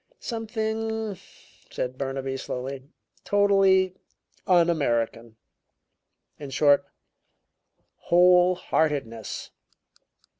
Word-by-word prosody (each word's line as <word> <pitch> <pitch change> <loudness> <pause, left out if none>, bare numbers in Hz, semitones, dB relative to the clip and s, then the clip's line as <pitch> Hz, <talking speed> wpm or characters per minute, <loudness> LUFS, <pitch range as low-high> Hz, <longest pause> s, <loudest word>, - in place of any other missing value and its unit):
"Something," 220 -2 -3 0.5
said 125 0 -4
Burnaby 135 0 -4
slowly, 130 +1 -5 0.4
"totally 195 -2 +3 0.5
un 175 -2 +5
American 120 -7 -1 1.0
in 145 -2 -7
short, 145 +1 +3 1.1
whole 180 +1 +4
heartedness." 135 -11 -2
170 Hz, 65 wpm, -25 LUFS, 135-195 Hz, 1.1 s, un